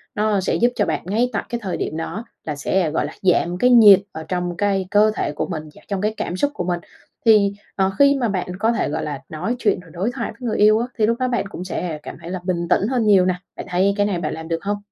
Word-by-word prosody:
nó 210 Hz, -1 st, +1 dB
sẽ -, -, 0 dB
giúp 240 Hz, -, +3 dB
cho -, -, +1 dB
bạn -, -, -1 dB
ngay 225 Hz, +6 st, +1 dB
tại 200 Hz, -, -1 dB
cái 235 Hz, -, -3 dB
thời 190 Hz, -3 st, -2 dB
điểm 155 Hz, -, -3 dB
đó 175 Hz, +7 st, -5 dB, 0.2 s
là 150 Hz, -2 st, -3 dB
sẽ, 160 Hz, +3 st, 0 dB
gọi 150 Hz, -, 0 dB
là, 150 Hz, -, -7 dB
giảm 180 Hz, -1 st, +2 dB
cái 250 Hz, +7 st, +3 dB
nhiệt 215 Hz, -6 st, +8 dB
ở 160 Hz, 0 st, -7 dB
trong 180 Hz, -1 st, -2 dB
cái 195 Hz, -2 st, 0 dB
cơ 215 Hz, +1 st, +5 dB
thể -, -, -1 dB
của 150 Hz, -, -3 dB
mình 160 Hz, -4 st, -4 dB
và -, -, -16 dB
trong 200 Hz, -2 st, -2 dB
cái 215 Hz, +1 st, 0 dB
cảm 175 Hz, -, -3 dB
xúc 285 Hz, +6 st, +1 dB
của -, -, -2 dB
mình. 175 Hz, -1 st, -1 dB, 0.5 s
Thì, 210 Hz, -3 st, +5 dB, 0.2 s
ờ, 190 Hz, -1 st, +1 dB
khi 280 Hz, 0 st, +6 dB
mà 235 Hz, -3 st, +1 dB
bạn 185 Hz, -3 st, -2 dB
có 220 Hz, +3 st, +2 dB
thể, 230 Hz, -, -1 dB
gọi 155 Hz, +2 st, -2 dB
là, 145 Hz, -2 st, -4 dB
nói 185 Hz, +10 st, -3 dB
chuyện 205 Hz, -6 st, +1 dB
rồi 180 Hz, -2 st, -15 dB
đối 195 Hz, +8 st, -1 dB
thoại -, -, -3 dB
với 250 Hz, -, -4 dB
người -, -, -1 dB
yêu 215 Hz, +1 st, +5 dB
á, 240 Hz, -, -1 dB
thì 215 Hz, -, +3 dB
lúc 230 Hz, +1 st, 0 dB
đó 255 Hz, -, +1 dB
bạn 240 Hz, -4 st, -1 dB
cũng 180 Hz, -3 st, -7 dB
sẽ 175 Hz, -4 st, -4 dB
cảm -, -, -8 dB
thấy 170 Hz, -, -8 dB
là 185 Hz, -, -3 dB
bình 175 Hz, -2 st, -1 dB
tĩnh 205 Hz, -, +3 dB
hơn 245 Hz, -3 st, 0 dB
nhiều 195 Hz, -3 st, +5 dB
nè. 185 Hz, -1 st, +1 dB, 0.2 s
Bạn -, -, -7 dB
thấy 190 Hz, +3 st, +2 dB
cái 205 Hz, -, +3 dB
này 195 Hz, -4 st, -1 dB
bạn 155 Hz, -3 st, -3 dB
làm 160 Hz, 0 st, -7 dB
được 165 Hz, 0 st, -3 dB
hông? 205 Hz, +1 st, -1 dB
195 Hz, 290 wpm, -21 LUFS, 175-215 Hz, 0.5 s, nhiệt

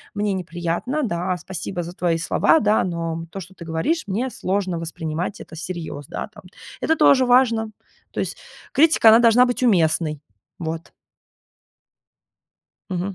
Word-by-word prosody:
мне 205 Hz, -1 st, 0 dB
неприятно. 175 Hz, -, -2 dB
Да, 180 Hz, +1 st, -1 dB
спасибо 175 Hz, 0 st, -5 dB
за 175 Hz, +2 st, -8 dB
твои 170 Hz, -3 st, 0 dB
слова, 180 Hz, -, +3 dB
да, 215 Hz, 0 st, +2 dB
но 165 Hz, -2 st, -3 dB
то, 195 Hz, -, -6 dB
что 190 Hz, 0 st, -10 dB
ты 170 Hz, -, -11 dB
говоришь, 165 Hz, -, -1 dB
мне 230 Hz, +7 st, -1 dB
сложно 185 Hz, -2 st, -2 dB
воспринимать 165 Hz, +3 st, -4 dB
это -, -, -12 dB
всерьез", 165 Hz, -4 st, -6 dB
да, -, -, -5 dB
там. 210 Hz, -, -14 dB, 0.4 s
Это 320 Hz, -, +2 dB
тоже 260 Hz, -3 st, +5 dB
важно. 235 Hz, -3 st, +3 dB, 0.4 s
То -, -, -2 dB
есть -, -, -4 dB, 0.4 s
критика, 310 Hz, -6 st, +6 dB
она 225 Hz, +2 st, +8 dB
должна 235 Hz, +1 st, +6 dB
быть 245 Hz, +1 st, -2 dB
уместной. 160 Hz, -, +2 dB, 0.4 s
Вот. 165 Hz, 0 st, -5 dB, 2.0 s
Мгм. 185 Hz, +2 st, -3 dB
185 Hz, 145 wpm, -22 LUFS, 165-225 Hz, 2.0 s, она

